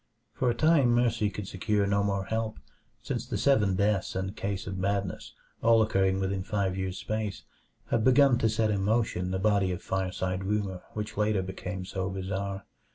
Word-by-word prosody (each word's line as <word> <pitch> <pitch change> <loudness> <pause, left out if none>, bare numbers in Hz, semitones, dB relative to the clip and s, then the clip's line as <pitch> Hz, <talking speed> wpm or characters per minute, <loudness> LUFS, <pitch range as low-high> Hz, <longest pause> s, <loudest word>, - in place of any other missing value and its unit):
For 125 - +1
a 120 - +1
time 145 -5 +4
Mercy 120 -3 +2
could 100 -1 -6
secure 100 +2 0
no 100 0 +2
more 100 -1 -1
help, 110 +1 -2 0.5
since - - -2
the - - -2
seven 105 -9 +3
deaths 100 0 +1
and 95 +2 -3
case 100 -1 -3
of 95 -1 -5
madness, 100 -1 -2 0.3
all 115 0 +5
occurring 95 -2 +1
within 95 0 -1
five 100 -2 -1
years' 95 -1 -3
space, 105 +2 -3 0.5
had 110 - +2
begun 130 0 +5
to 115 - +2
set 110 0 +1
in 100 -2 0
motion 105 -4 +1
the 95 - -1
body 100 -1 +2
of 90 - -5
fireside 95 0 -2
rumor 100 -2 -2
which 105 0 -5
later 105 -2 +1
became 95 0 -5
so 95 0 -3
bizarre. 95 +1 -4
100 Hz, 180 wpm, -28 LUFS, 95-110 Hz, 0.5 s, all